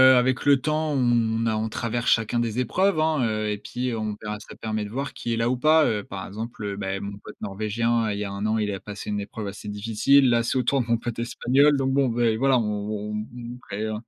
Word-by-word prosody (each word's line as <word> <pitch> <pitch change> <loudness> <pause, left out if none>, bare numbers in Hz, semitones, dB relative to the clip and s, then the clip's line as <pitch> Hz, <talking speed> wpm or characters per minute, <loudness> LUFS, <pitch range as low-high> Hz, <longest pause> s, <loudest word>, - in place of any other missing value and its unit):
avec 125 +1 +2
le 140 -2 +5
temps, 155 +1 0
on 115 -3 +2
a 110 -1 +1
on 110 +1 -1
traverse 120 +2 -1
chacun 115 +1 +2
des 120 +1 -1
épreuves, 185 - +2
hein, 155 -4 +2
heu, 110 -1 -1
et 105 - -1
puis 125 +4 -3
on 110 -2 -2
verra 105 -1 -4
ça - - -12
permet 110 -1 -3
de - - -7
voir 135 +4 -4
qui 120 - -3
est - - -1
là 115 +1 +1
ou 130 - 0
pas, 155 +3 +5
heu, 105 -2 0
par 95 -1 -7
exemple, 110 +2 -7
heu, 100 -1 -3
bah 95 -1 -3
mon 100 0 -6
pote 105 - -12
norvégien, 110 +3 0
il 100 - -3
y - - -1
a 100 - -4
1 100 +2 -4
an, 110 +1 +1
il 105 -1 0
a 95 - -4
passé 105 +1 -7
une 105 0 -1
épreuve 100 +1 -6
assez 100 +1 -8
difficile. 115 +6 +3
Là, 115 -1 +3
c'est 125 - 0
au 125 - +2
tour 135 +2 +2
de 115 - -5
mon 115 0 +2
pote 115 0 -5
espagnol, 135 +5 +3
donc 135 0 0
bon, 135 -2 +3
beh 115 -1 +1
voilà, 135 0 +3
on 105 -1 -2
on 105 0 -4 0.2
on 120 0 -7
crée, 100 +2 -4
heu, 110 - -2
115 Hz, 265 wpm, -25 LUFS, 105-125 Hz, 0.2 s, le